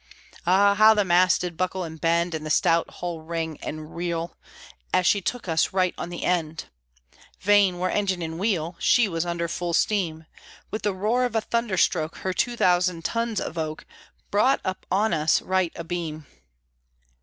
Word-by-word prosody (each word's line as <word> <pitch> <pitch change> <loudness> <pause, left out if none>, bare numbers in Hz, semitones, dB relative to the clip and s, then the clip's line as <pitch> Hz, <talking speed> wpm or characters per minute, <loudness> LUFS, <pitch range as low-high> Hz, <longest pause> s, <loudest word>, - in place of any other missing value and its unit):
Ah! 200 +3 +5
how 215 +2 +6
the 205 -2 +2
masts 180 0 +4
did 175 -2 -4
buckle 185 +2 -2
and 160 -2 -8
bend, 170 +1 +1
And 155 -1 -4
the 155 - -5
stout 165 +2 +2
hull 175 -2 -6
ring 160 -1 -4
and 155 +1 -7
reel, 170 -1 -3 0.6
As 180 - +2
she 200 +2 +3
took 245 +2 -4
us 160 +1 +1
right 185 -2 +2
on 175 - -6
end! 170 -2 -2 0.8
(Vain 200 -3 +4
were 185 +1 -1
engine 190 -4 0
and 160 +1 -5
wheel, 180 -5 -1
She 245 -3 +4
was 170 -2 -2
under 170 0 -2
full 170 0 -2
steam) 165 -7 0 0.5
With 215 - -3
the 205 -2 -1
roar 220 +6 +1
of 245 -2 -2
a 225 - +2
thunder 230 -3 -1
stroke 160 -2 +1
Her 185 - -3
two 240 +5 -1
thousand 180 -3 +2
tons 230 -2 -1
of 165 - -4
oak 155 -1 -4 0.5
Brought 250 +7 +3
up 185 -1 -4
on 210 +4 +1
us, 155 0 +2
right 185 -2 0
abeam! 165 -2 -5
175 Hz, 180 wpm, -25 LUFS, 165-200 Hz, 0.8 s, how